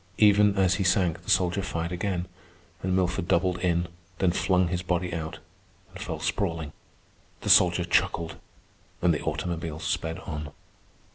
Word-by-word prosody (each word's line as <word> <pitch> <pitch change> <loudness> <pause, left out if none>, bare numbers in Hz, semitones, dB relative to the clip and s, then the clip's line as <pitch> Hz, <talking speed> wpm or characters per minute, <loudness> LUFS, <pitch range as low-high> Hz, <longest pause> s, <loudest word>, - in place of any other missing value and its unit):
Even 105 -1 +5
as 95 -1 +4
he - - +2
sank 90 -3 +2
the - - -11
soldier 90 +1 +2
fired 85 -2 -3
again, 90 0 -2 0.5
and 95 0 0
Milford 90 -2 0
doubled 90 +1 +2
in, 85 -1 +1 0.3
then 95 -1 +2
flung 90 0 +2
his 90 0 -1
body 90 -1 -1
out, 80 0 -4 0.6
and - - -9
fell 80 - -4
sprawling. 85 -2 -2 0.7
The - - -3
soldier 90 0 +6
chuckled, 85 -1 0 0.7
and 90 -2 +5
the 75 - -2
automobile 80 0 -3
sped 80 +1 -2
on. 75 -2 -5
90 Hz, 150 wpm, -27 LUFS, 80-90 Hz, 0.7 s, soldier